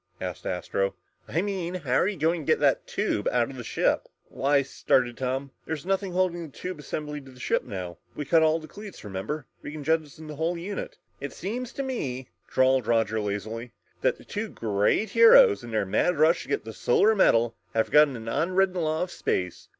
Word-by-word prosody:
asked -, -, -5 dB
Astro. -, -, -1 dB, 0.3 s
"I -, -, 0 dB
mean 185 Hz, -3 st, -3 dB
how 145 Hz, -8 st, -3 dB
are 175 Hz, -, +4 dB
you 205 Hz, -2 st, -2 dB
going 165 Hz, +2 st, +1 dB
to 145 Hz, -, 0 dB
get -, -, +3 dB
the -, -, +3 dB
tube 105 Hz, -, -1 dB
out 120 Hz, +1 st, +1 dB
of -, -, -10 dB
the 125 Hz, -, -7 dB
ship?" -, -, 0 dB, 0.2 s
"Why," 140 Hz, +1 st, +2 dB
started 125 Hz, -2 st, +1 dB
Tom, 130 Hz, +2 st, -3 dB, 0.2 s
"there's 160 Hz, -2 st, -4 dB
nothing 195 Hz, -1 st, -1 dB
holding 180 Hz, -1 st, +1 dB
that 155 Hz, -5 st, -9 dB
tube 180 Hz, -3 st, -6 dB
assembly 150 Hz, 0 st, -5 dB
to 135 Hz, -, -14 dB
the 130 Hz, -1 st, -15 dB
ship -, -, 0 dB
now. 90 Hz, -3 st, -6 dB, 0.2 s
We 150 Hz, -, -4 dB
cut 165 Hz, +4 st, +4 dB
all 160 Hz, 0 st, +4 dB
the 155 Hz, -1 st, -9 dB
cleats, 205 Hz, +2 st, -10 dB
remember? 105 Hz, +9 st, -4 dB, 0.2 s
We -, -, -7 dB
can 150 Hz, -1 st, -7 dB
jettison 155 Hz, 0 st, -1 dB
the 150 Hz, -1 st, -8 dB
whole 165 Hz, +3 st, 0 dB
unit!" 195 Hz, +4 st, -5 dB, 0.2 s
"It 140 Hz, -, -6 dB
seems 240 Hz, +6 st, -4 dB
to 275 Hz, -, -3 dB
me," 130 Hz, -, -4 dB, 0.2 s
drawled 130 Hz, -2 st, +3 dB
Roger 115 Hz, -2 st, +2 dB
lazily, 110 Hz, +4 st, -4 dB, 0.3 s
"that -, -, +2 dB
the -, -, -16 dB
two 210 Hz, +1 st, -4 dB
great 105 Hz, -, 0 dB
heroes 470 Hz, -1 st, +7 dB
in -, -, -8 dB
their 110 Hz, -3 st, 0 dB
mad 110 Hz, -, +1 dB
rush 160 Hz, +3 st, +3 dB
for 140 Hz, -, +1 dB
the 110 Hz, 0 st, -10 dB
Solar 210 Hz, -, +3 dB
Medal 115 Hz, -, +3 dB, 0.2 s
have 110 Hz, -, +3 dB
forgotten 150 Hz, -3 st, +5 dB
an 115 Hz, -1 st, -8 dB
unwritten 185 Hz, +7 st, +1 dB
law 155 Hz, +1 st, 0 dB
of 180 Hz, -, -5 dB
space. 90 Hz, -1 st, -2 dB
150 Hz, 205 wpm, -26 LUFS, 120-180 Hz, 0.3 s, heroes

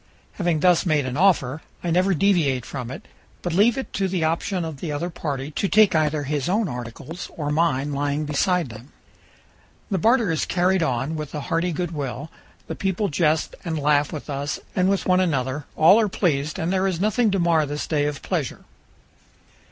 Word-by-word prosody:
Having 175 Hz, -5 st, -1 dB
thus 180 Hz, -1 st, +4 dB
made 155 Hz, -6 st, +1 dB
an 130 Hz, 0 st, -3 dB
offer, 160 Hz, -5 st, +2 dB, 0.2 s
I 175 Hz, -, -1 dB
never 185 Hz, +2 st, +3 dB
deviate 150 Hz, -, +2 dB
from 125 Hz, -4 st, -6 dB
it, 130 Hz, -, -9 dB, 0.4 s
but 175 Hz, -, -2 dB
leave 215 Hz, +7 st, +4 dB
it 265 Hz, -, -5 dB
to 195 Hz, -1 st, 0 dB
the 180 Hz, -3 st, -1 dB
option 170 Hz, +3 st, -1 dB
of 160 Hz, -3 st, -6 dB
the 160 Hz, -, -4 dB
other 165 Hz, +5 st, -3 dB
party 145 Hz, -3 st, -4 dB
to 195 Hz, -, -1 dB
take 215 Hz, -1 st, +5 dB
either 155 Hz, -2 st, +1 dB
his 145 Hz, +1 st, -2 dB
own 210 Hz, +2 st, +1 dB
articles 125 Hz, +8 st, -7 dB
or 145 Hz, -2 st, -2 dB
mine 145 Hz, -3 st, +1 dB
lying 145 Hz, +2 st, -1 dB
beside 160 Hz, +2 st, +1 dB
them. 115 Hz, +5 st, -12 dB, 1.0 s
The 190 Hz, -, +1 dB
barter 230 Hz, 0 st, +3 dB
is 160 Hz, -, 0 dB
carried 185 Hz, +1 st, +2 dB
on 135 Hz, +1 st, -1 dB
with 150 Hz, -1 st, -6 dB
a 150 Hz, -, -3 dB
hearty 170 Hz, +5 st, -1 dB
good 175 Hz, +1 st, -3 dB
will; 145 Hz, 0 st, -5 dB, 0.3 s
the -, -, -5 dB
people 195 Hz, +1 st, -1 dB
jest 155 Hz, 0 st, +1 dB
and 165 Hz, -4 st, -2 dB
laugh 145 Hz, 0 st, +2 dB
with 150 Hz, -, -7 dB
us 145 Hz, 0 st, -3 dB, 0.2 s
and 185 Hz, 0 st, +3 dB
with 195 Hz, -1 st, 0 dB
one 185 Hz, 0 st, +3 dB
another; 140 Hz, -5 st, -1 dB
all 170 Hz, +7 st, +6 dB
are 215 Hz, -2 st, +2 dB
pleased, 155 Hz, -6 st, 0 dB
and 170 Hz, +3 st, -1 dB
there 190 Hz, 0 st, +2 dB
is 180 Hz, -3 st, -2 dB
nothing 215 Hz, +3 st, +2 dB
to 195 Hz, -, +1 dB
mar 165 Hz, -4 st, +2 dB
this 145 Hz, +1 st, -3 dB
day 145 Hz, -2 st, 0 dB
of 150 Hz, -1 st, -5 dB
pleasure. -, -, -3 dB
160 Hz, 200 wpm, -23 LUFS, 145-185 Hz, 1.0 s, all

